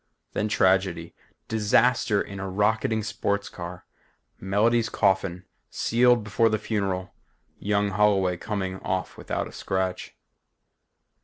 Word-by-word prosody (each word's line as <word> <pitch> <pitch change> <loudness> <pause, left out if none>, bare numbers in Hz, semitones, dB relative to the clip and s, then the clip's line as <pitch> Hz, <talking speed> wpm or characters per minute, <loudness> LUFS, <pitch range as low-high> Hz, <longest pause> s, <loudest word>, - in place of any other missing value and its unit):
Then 105 - 0
tragedy. 95 -4 +1 0.3
Disaster 110 0 +2
in 100 -1 -8
a 95 -1 -4
rocketing 110 +3 +1
sports 100 -1 -2
car; 90 0 -8 0.5
Melody's 110 +4 +2
coffin 95 -1 +1 0.3
sealed 120 0 +3
before 115 +2 +2
the 110 - +1
funeral; 100 -4 -2 0.5
young 100 0 +1
Holloway 95 -2 +2
coming 95 -2 -3
off 95 0 -3
without - - -3
a - - -11
scratch. 95 -1 -3
100 Hz, 110 wpm, -25 LUFS, 95-110 Hz, 0.5 s, sealed